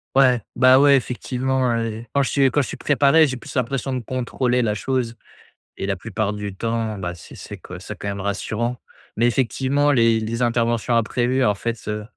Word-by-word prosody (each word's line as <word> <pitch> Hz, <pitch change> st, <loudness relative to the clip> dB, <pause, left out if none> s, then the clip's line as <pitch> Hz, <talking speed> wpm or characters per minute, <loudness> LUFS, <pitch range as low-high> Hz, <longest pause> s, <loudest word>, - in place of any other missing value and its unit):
Ouais! 130 Hz, -3 st, +5 dB
Bah, 130 Hz, +1 st, +6 dB
ouais, 140 Hz, 0 st, +6 dB
effectivement, 130 Hz, 0 st, -1 dB
hein 115 Hz, -2 st, +1 dB
et 115 Hz, +1 st, -6 dB
quand 140 Hz, -, +3 dB
je 135 Hz, -, 0 dB
suis 135 Hz, -2 st, +3 dB
quand 145 Hz, -, +2 dB
je -, -, -3 dB
suis -, -, -7 dB
préparé, 145 Hz, +2 st, +4 dB
j'ai 130 Hz, -3 st, -2 dB
plus 120 Hz, -, -10 dB
l'impression 135 Hz, +1 st, -1 dB
de 130 Hz, -, -1 dB
contrôler 125 Hz, +1 st, -1 dB
la 105 Hz, -3 st, 0 dB
chose 120 Hz, 0 st, -2 dB, 0.6 s
et -, -, -3 dB
la 100 Hz, 0 st, -1 dB
plupart 105 Hz, +1 st, -3 dB
du 105 Hz, -2 st, -6 dB
temps, 115 Hz, 0 st, -2 dB
bah, 90 Hz, -2 st, -4 dB
c'est 85 Hz, -, -13 dB
c'est -, -, -9 dB
co -, -, -10 dB
c'est -, -, -8 dB
quand -, -, -7 dB
même 100 Hz, 0 st, -3 dB
rassurant. 110 Hz, +5 st, -2 dB, 0.4 s
Mais 115 Hz, +3 st, +3 dB
effectivement, 135 Hz, +4 st, +1 dB
les 115 Hz, -4 st, +3 dB
les 115 Hz, +2 st, -3 dB
interventions 120 Hz, 0 st, +1 dB
imprévues, 120 Hz, +3 st, +1 dB
en 105 Hz, -, +3 dB
fait, 115 Hz, +3 st, -4 dB
heu, 105 Hz, 0 st, -3 dB
120 Hz, 205 wpm, -22 LUFS, 110-130 Hz, 0.6 s, Bah